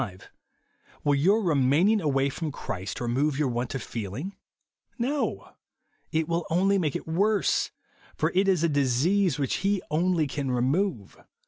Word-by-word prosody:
Will 145 - +3
your 195 +10 +3
remaining 160 +6 +3
aivay 140 -5 +1
froon 160 -3 -3
Christ 95 -8 -5
remove 130 +4 0
your 145 -3 +1
want 120 +2 -3
of 130 - -3
feeling? 120 - -5 0.6
No. 275 +5 -2 0.6
It 160 -1 0
will 170 0 -1
only 195 +4 +3
make 155 -6 -1
it - - -4
worse; 200 +6 +1 0.5
for - - 0
it 190 +2 +3
is 185 -4 +2
a - - +4
disease 150 +5 +2
which 140 -3 -1
he 200 +1 +1
only 170 0 +2
can 140 -1 -3
remove. 130 - -1
155 Hz, 145 wpm, -27 LUFS, 135-190 Hz, 0.6 s, a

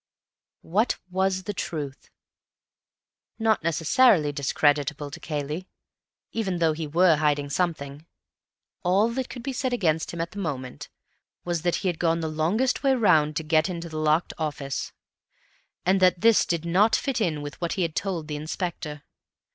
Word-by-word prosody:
What 210 +8 +1
was 190 0 0
the 205 - -4
truth? 145 -7 -5 1.3
Not 220 -5 +2
necessarily 165 - +4
discreditable 145 0 0
to - - -8
Cayley, 150 +4 -4 0.6
even 195 -6 -1
though 165 -2 +2
he 155 0 -4
were 165 +1 +4
hiding 145 -2 0
something. 150 -3 -2 0.7
All 195 +5 +3
that 255 +2 -3
could 245 - -8
be 270 - -3
said 255 0 -1
against 160 -8 +1
him 170 - -6
at 170 +1 -2
the 205 - -7
moment 130 -8 -5 0.6
was 175 -2 -1
that 175 0 +1
he - - +3
had 175 -3 -1
gone 165 -1 +2
the 160 - -2
longest 170 +12 0
way 270 -2 +3
round 155 -10 +3
to 160 - -1
get 155 +3 +2
into 170 -1 -5
the 155 -1 -5
locked 155 +2 +1
office—and 155 +5 -5
that 180 -2 +3
this 230 -1 +5
did 170 -1 -1
not 205 +6 +4
fit 270 -5 -1
in 155 -7 0
with 145 +3 -8
what 170 - -1
he 185 - 0
had 165 -2 -2
told 175 -6 -2
the 150 -1 -4
Inspector. 155 -1 -5
165 Hz, 165 wpm, -25 LUFS, 150-190 Hz, 1.3 s, this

